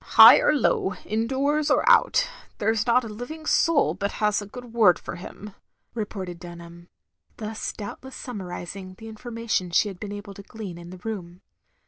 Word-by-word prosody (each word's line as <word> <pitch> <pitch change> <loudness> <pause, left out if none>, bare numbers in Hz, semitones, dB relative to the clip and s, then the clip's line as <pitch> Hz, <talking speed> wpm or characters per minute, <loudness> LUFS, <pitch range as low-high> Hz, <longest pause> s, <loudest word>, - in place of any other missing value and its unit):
" - - -23
High - - +11
or - - +3
low, 210 -7 +1
indoors 270 +7 0
or - - +2
out, - - +5 0.3
there 220 +2 +1
's 225 +1 -1
not 245 +2 +4
a - - -5
living 245 +9 -7
soul 330 -1 +3
but 200 0 -3
has 210 -1 +1
a 205 - -8
good 245 +2 -10
word 205 -8 +5
for - - -7
him," 195 +3 -10 0.4
re 220 -3 -2
ported 185 -4 -7
Dunham, 170 -1 -11 0.5
thus 220 0 -4
doubtless 260 +5 -8
sunmiarising 185 -4 -7
the 225 - -10
information 225 -4 -3
she 190 +4 +3
had 190 -3 -10
been 205 - -6
able 205 0 -7
to 200 - -10
glean 200 -4 -8
in 170 0 -10
the 185 - -9
Room. 185 -4 -6
210 Hz, 185 wpm, -25 LUFS, 185-235 Hz, 0.5 s, High